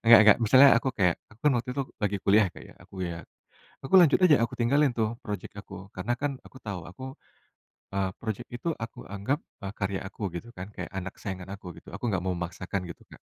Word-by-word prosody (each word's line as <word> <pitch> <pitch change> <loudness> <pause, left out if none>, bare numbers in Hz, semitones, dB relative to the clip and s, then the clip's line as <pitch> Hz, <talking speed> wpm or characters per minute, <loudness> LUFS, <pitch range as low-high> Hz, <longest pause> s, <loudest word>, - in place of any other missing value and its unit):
Enggak 115 0 +10
enggak. 105 -1 +8
Misalnya 130 +4 +7
aku 130 - -2
kayak 90 -6 +2
aku 110 - -20
kan 150 - +5
waktu 120 - -5
itu 140 - 0 0.2
lagi 105 -3 0
kuliah, 105 +1 +5
ya, - - -5
Kak, - - -11
ya. - - -13
Aku, - - -18
ya 85 -2 -3 0.6
aku 135 - -8
lanjut 175 -6 +7
aja, 180 -5 +7
aku 120 +2 -2
tinggalin 140 +4 +4
tuh 115 -1 -1
projek 105 -4 -5
aku, 100 -1 -9
karena 95 +6 -1
kan 140 -1 -1
aku - - -14
tahu 100 -6 -5
aku 100 +9 -11 0.9
eee, 95 -1 0
projek 115 +1 -4
itu 120 +6 -5
aku 115 0 -6
anggap, 105 +8 -1 0.2
eee, 100 -1 -5
karya 95 -2 -2
aku, 100 -2 -5
gitu 90 +7 -6
kan, 95 +3 -7
kayak - - -6
anak 95 0 -4
kesayangan 95 -1 -5
aku, 90 -4 -9
gitu. - - -13
Aku 120 - -3
nggak 95 -5 0
mau 95 - 0
memaksakan, 90 +2 -4
gitu, 85 - -10
Kak. - - -13
105 Hz, 225 wpm, -28 LUFS, 95-120 Hz, 0.9 s, Enggak